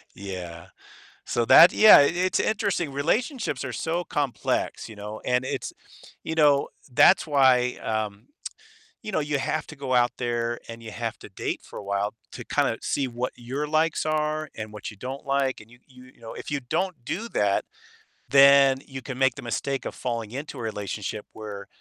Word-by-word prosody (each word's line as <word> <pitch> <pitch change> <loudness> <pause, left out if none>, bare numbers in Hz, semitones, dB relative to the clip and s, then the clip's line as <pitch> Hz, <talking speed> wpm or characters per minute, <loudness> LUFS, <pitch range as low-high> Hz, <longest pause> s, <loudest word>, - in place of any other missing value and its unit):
Yeah. 90 -3 -7 0.6
So 120 - 0
that 170 - +9
yeah, 215 0 +9
it's 175 +6 +2
interesting. 200 - 0
Relationships 170 - -1
are 130 - -4
so 165 +9 -2
complex, 140 -6 -2
you 110 - -11
know? 105 +1 -7
And 125 0 +1
it's - - -4 0.5
you 160 - -4
know, 145 -3 +4 0.2
that's 145 +2 +5
why, 130 -4 +3
um, 110 -2 -3 0.8
you 215 - -5
know, - - +1
you 145 -1 -1
have 155 +3 -2
to 160 - -10
go 135 -2 -3
out 120 0 +4
there 120 -1 -2
and 115 0 -9
you 110 - -8
have 115 +1 -4
to - - -12
date 95 - -4
for - - -10
a - - -9
while 100 +1 -1 0.2
to - - -8
kinda - - 0
see 135 -2 -1
what 125 +1 -3
your 135 +5 -4
likes 155 +1 +1
are 155 0 -1
and 110 -1 -6
what 105 0 -7
you 105 - -14
don't 130 +7 -7
like, 135 -1 0
and 110 - -17
you 120 - -18
you 125 -1 -16
you - - -27
know, 115 - -8
if - - -8
you 145 - 0
don't 155 +2 -3
do 215 - -4
that, 100 - +1 0.6
then 140 -1 +7
you 135 -1 -8
can 125 0 -7
make 135 -2 +2
the - - -8
mistake 135 +3 -3
of - - -5
falling 115 -3 -4
into 140 +1 -6
a - - -5
relationship 105 -1 -4
where 105 -2 -8
130 Hz, 190 wpm, -25 LUFS, 115-150 Hz, 0.8 s, that